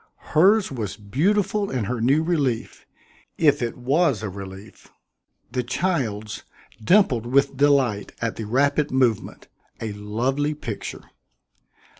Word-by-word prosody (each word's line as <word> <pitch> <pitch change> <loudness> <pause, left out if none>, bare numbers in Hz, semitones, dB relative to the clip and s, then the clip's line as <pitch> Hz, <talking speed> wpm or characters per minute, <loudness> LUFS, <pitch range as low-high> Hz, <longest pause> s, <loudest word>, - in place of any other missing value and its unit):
Hers 195 +5 +4
was 110 -7 -4
beautiful 195 - 0
in 125 -4 -2
her 120 +2 -3
new 140 +7 +3
relief 145 -9 -1 0.5
if 145 -4 +3
it 120 -1 -3
was 135 - +1
a 105 - -2
relief 95 +1 -10 0.6
the 125 0 0
child's 120 - -2 0.4
dimpled 125 - +3
with 140 +2 +2
delight 135 -7 +2
at 115 -1 -2
the 110 - -5
rapid 140 +6 +1
movement 125 -5 0 0.3
a 110 -2 -4
lovely 125 +9 -1
picture. 115 -8 -6
130 Hz, 120 wpm, -23 LUFS, 110-150 Hz, 0.6 s, Hers